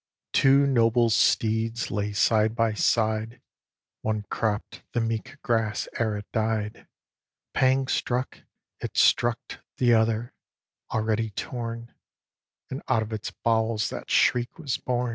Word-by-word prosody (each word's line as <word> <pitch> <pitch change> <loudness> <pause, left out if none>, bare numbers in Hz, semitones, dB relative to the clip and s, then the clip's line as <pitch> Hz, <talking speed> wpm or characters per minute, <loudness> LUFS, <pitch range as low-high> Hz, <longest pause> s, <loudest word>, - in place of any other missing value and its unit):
Two 135 +1 +5
noble 120 -3 +3
steeds 115 +1 +1
lay 105 0 -1
side 110 +1 +2
by 115 -1 +1
side, 110 +1 0 0.6
One 110 -1 -1
cropp'd 110 -2 -2
the 120 - +1
meek 115 +3 -3
grass 110 -3 0
ere 110 -3 0
it 105 - -7
died; 110 -1 -2 0.7
Pang 130 0 +3
struck 130 -1 -2 0.4
it - - -6
struck 120 -1 +2 0.2
t' 120 -2 +4
other, 115 +1 +1 0.6
already 110 0 0
torn, 115 +2 -6 0.8
And 130 - -4
out 115 -4 +3
of 110 +1 -7
its 110 0 -4
bowels 110 -2 0
that - - -7
shriek 120 0 +2
was 145 -7 -2
born. 125 -1 -1
115 Hz, 125 wpm, -26 LUFS, 110-120 Hz, 0.8 s, Two